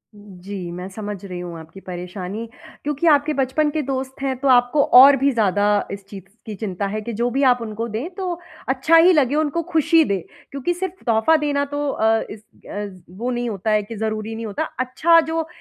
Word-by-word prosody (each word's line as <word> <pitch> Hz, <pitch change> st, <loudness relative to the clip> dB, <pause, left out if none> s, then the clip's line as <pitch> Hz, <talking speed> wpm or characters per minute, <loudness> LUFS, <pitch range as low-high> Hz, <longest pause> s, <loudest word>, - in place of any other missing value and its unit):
जी, 195 Hz, -2 st, -8 dB
मैं 180 Hz, +2 st, -6 dB
समझ 205 Hz, -1 st, -7 dB
रही 180 Hz, -2 st, -6 dB
हूँ 175 Hz, -2 st, -7 dB
आपकी 160 Hz, +4 st, -12 dB
परेशानी 185 Hz, +4 st, -6 dB, 0.4 s
क्योंकि 295 Hz, +3 st, -1 dB
आपके 295 Hz, 0 st, +4 dB
बचपन 275 Hz, +3 st, +1 dB
के 305 Hz, +1 st, -1 dB
दोस्त 265 Hz, 0 st, -4 dB
हैं, 270 Hz, -1 st, -1 dB
तो 275 Hz, -, -2 dB
आपको 250 Hz, +3 st, +4 dB
और 275 Hz, +2 st, +10 dB
भी 275 Hz, +2 st, +2 dB
ज़्यादा 205 Hz, -2 st, +1 dB
इस 200 Hz, 0 st, -7 dB
चीज़ 195 Hz, -3 st, -9 dB, 0.2 s
की 215 Hz, -2 st, -6 dB
चिंता 200 Hz, -2 st, -4 dB
है 215 Hz, +2 st, -3 dB
कि 235 Hz, +2 st, -6 dB
जो 235 Hz, +3 st, 0 dB
भी 270 Hz, +3 st, 0 dB
आप 250 Hz, -2 st, +4 dB
उनको 225 Hz, +1 st, -4 dB
दें, 235 Hz, +11 st, -4 dB
तो 360 Hz, -3 st, -3 dB, 0.3 s
अच्छा 270 Hz, +5 st, +3 dB
ही 345 Hz, +3 st, +7 dB
लगे, 285 Hz, -3 st, +2 dB
उनको 310 Hz, +2 st, 0 dB
खुशी 325 Hz, 0 st, +4 dB
दे, 200 Hz, -, 0 dB, 0.3 s
क्योंकि 280 Hz, +6 st, -2 dB
सिर्फ़ 375 Hz, +1 st, -6 dB
तोहफ़ा 230 Hz, +7 st, +3 dB
देना 285 Hz, -1 st, 0 dB
तो 290 Hz, 0 st, -2 dB
अ, 225 Hz, -2 st, +2 dB
इस 210 Hz, -, -9 dB, 0.3 s
अज़ 200 Hz, -3 st, -6 dB, 0.2 s
वो 245 Hz, +2 st, -2 dB
नहीं 240 Hz, -1 st, -2 dB
होता 210 Hz, +1 st, -2 dB
है 210 Hz, 0 st, +3 dB
कि 225 Hz, +2 st, -8 dB
ज़रूरी 215 Hz, +1 st, -3 dB
नहीं 225 Hz, 0 st, -5 dB
होता। 210 Hz, +9 st, -3 dB, 0.2 s
अच्छा, 310 Hz, +7 st, +4 dB
जो 320 Hz, 0 st, -3 dB
240 Hz, 210 wpm, -21 LUFS, 205-290 Hz, 0.4 s, और